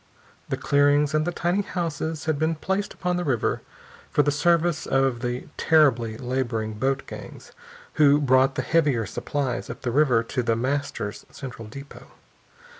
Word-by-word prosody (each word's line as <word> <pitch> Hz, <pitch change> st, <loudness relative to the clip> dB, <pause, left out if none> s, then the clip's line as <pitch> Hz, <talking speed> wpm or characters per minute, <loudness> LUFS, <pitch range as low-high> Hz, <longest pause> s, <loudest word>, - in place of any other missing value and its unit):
The -, -, -1 dB
clearings 145 Hz, +1 st, +3 dB
and 155 Hz, +1 st, +1 dB
the -, -, +1 dB
tiny 175 Hz, +3 st, 0 dB
houses 165 Hz, -4 st, -3 dB
had 155 Hz, -3 st, 0 dB
been 160 Hz, +1 st, +1 dB
placed 190 Hz, +5 st, -2 dB
upon 180 Hz, -1 st, -1 dB
the 180 Hz, -, -1 dB
river 130 Hz, -8 st, 0 dB, 0.5 s
for 145 Hz, -, +3 dB
the 145 Hz, -, +2 dB
service 170 Hz, +2 st, +1 dB
of 135 Hz, -2 st, +1 dB
the 125 Hz, 0 st, -3 dB
terribly 130 Hz, -8 st, +3 dB
laboring 120 Hz, -4 st, -2 dB
boat 135 Hz, +5 st, -1 dB
gangs -, -, -10 dB, 0.5 s
who 145 Hz, 0 st, +6 dB
brought 130 Hz, -1 st, +3 dB
the -, -, -1 dB
heavier 145 Hz, -9 st, +2 dB
supplies 130 Hz, +4 st, -3 dB
up -, -, -8 dB
the 120 Hz, -, -1 dB
river 130 Hz, -4 st, +3 dB
to 125 Hz, +2 st, -2 dB
The 115 Hz, -1 st, +1 dB
Master's 130 Hz, -4 st, -3 dB
central 120 Hz, -5 st, -8 dB
depot. 140 Hz, +5 st, -11 dB
140 Hz, 160 wpm, -25 LUFS, 125-155 Hz, 0.5 s, who